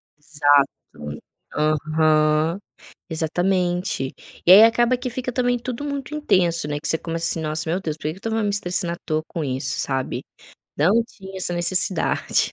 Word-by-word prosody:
Exato. 145 -2 +3 0.9
Aham, 155 +2 +2 0.5
exatamente. 175 -2 -1 0.3
E 175 - +9
aí 200 +3 +10
acaba 240 +2 +3
que 250 0 -5
fica 250 +1 -4
também 245 0 +1
tudo 250 +3 -5
muito 280 0 -4
intenso, 175 - +1
né, 145 0 -2
que - - -3
você - - +3
começa, 165 0 -2
assim: 165 - -1
"Nossa, 155 0 -2
meu 175 +4 0
Deus! 155 -5 -3
Por - - -21
que 155 - -1
que - - -13
eu - - -12
estava 225 +1 -2
me 205 - 0
estressando 180 -3 -1
atoa 155 -2 -3
com 165 - -4
isso? 130 -1 -2
Sabe, 130 -1 -2 0.5
não 200 +10 +4
tinha 195 -4 -12
essa 180 -1 -1
necessidade". 175 0 0
170 Hz, 170 wpm, -22 LUFS, 155-205 Hz, 0.9 s, aí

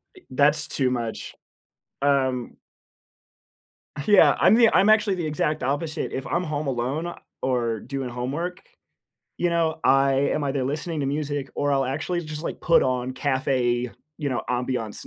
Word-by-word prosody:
I - - -14
that's 150 +3 +3
too 130 -2 0
much. 115 -3 -4 0.7
Um 130 -3 0 1.5
Yeah, 205 -2 +6
I'm - - +6
the 230 -1 +6
I'm 200 +2 +5
actually 210 -2 +4
the 175 -3 -3
exact 150 0 -1
opposite. 150 +4 -2
If 130 - -4
I'm 175 - 0
home 155 -3 -3
alone 135 +7 -2 0.3
or 120 -4 0
doing 135 +2 -5
homework, 140 +9 -4 0.8
you 175 - 0
know, 165 -1 0
I 135 0 +4 0.2
am 150 - -1
either 135 -1 -1
listening 150 +4 -3
to 140 - -1
music 145 -1 -2
or 145 0 0
I'll 135 -1 +2
actually 155 +7 -2
just, 155 0 -6
like, - - -5
put 165 - +4
on 125 0 -1
café, 130 -3 0 0.3
you 145 -3 -2
know, 130 -3 -2
ambiance 125 -3 -2
140 Hz, 155 wpm, -24 LUFS, 130-155 Hz, 1.5 s, Yeah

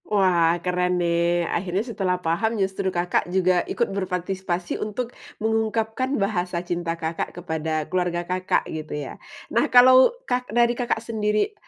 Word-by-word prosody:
Wah 175 -5 +3
keren 180 0 +1
nih, 170 0 +1
akhirnya 185 +5 -1
setelah 190 -6 -1
paham 220 +8 0
justru 190 -1 -1
Kakak 175 -1 0
juga 185 -1 +2
ikut 235 - +1
berpartisipasi 185 -1 -3
untuk 230 +3 -3 0.2
mengungkapkan 225 +4 0
bahasa 185 -3 -1
cinta 170 -1 -2
Kakak 165 0 -3
kepada 160 -2 -2
keluarga 175 -1 -1
Kakak 185 +1 0
gitu 155 -1 -5
ya. 145 -2 -7 0.3
Nah, - - +2
kalau 255 +1 +8 0.2
Kak 250 - -2
dari 240 +1 +3
Kakak 235 -2 -2
sendiri, 215 - 0
185 Hz, 140 wpm, -24 LUFS, 175-220 Hz, 0.3 s, kalau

